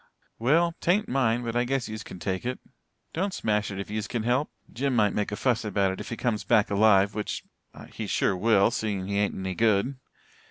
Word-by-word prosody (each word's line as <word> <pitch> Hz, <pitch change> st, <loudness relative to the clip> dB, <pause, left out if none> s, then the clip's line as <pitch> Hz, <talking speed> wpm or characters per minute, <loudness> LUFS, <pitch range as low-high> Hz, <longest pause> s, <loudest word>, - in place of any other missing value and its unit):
"Well, 165 Hz, +8 st, +3 dB
'tain't 190 Hz, +5 st, +2 dB
mine 120 Hz, -2 st, +1 dB
but 115 Hz, 0 st, -3 dB
I 120 Hz, -, +3 dB
guess 130 Hz, 0 st, -1 dB
yez 110 Hz, 0 st, -6 dB
kin 95 Hz, -, -9 dB
take 95 Hz, +1 st, -3 dB
it. 125 Hz, +1 st, -3 dB, 0.5 s
Don't 190 Hz, +3 st, -1 dB
smash 105 Hz, -2 st, 0 dB
it 100 Hz, -1 st, -5 dB
if 100 Hz, -, -6 dB
yez 105 Hz, -1 st, -2 dB
can 115 Hz, -3 st, -3 dB
help 125 Hz, +6 st, +1 dB, 0.2 s
Jim 135 Hz, +2 st, -1 dB
might 105 Hz, -3 st, +3 dB
make 105 Hz, -1 st, -1 dB
a -, -, -2 dB
fuss 120 Hz, 0 st, +1 dB
about 100 Hz, -2 st, +1 dB
it 95 Hz, -, -6 dB
if -, -, -7 dB
he 115 Hz, -, -4 dB
comes 115 Hz, -4 st, -1 dB
back 110 Hz, -3 st, +3 dB
alive 100 Hz, -1 st, +4 dB
which 105 Hz, 0 st, -4 dB, 0.5 s
he -, -, -5 dB
sure -, -, +1 dB
will, 105 Hz, +2 st, +3 dB
seein' 105 Hz, -5 st, -2 dB
he 100 Hz, +1 st, -1 dB
ain't 105 Hz, -, 0 dB
any 95 Hz, 0 st, -3 dB
good. 110 Hz, +5 st, +1 dB
110 Hz, 215 wpm, -27 LUFS, 100-125 Hz, 0.5 s, alive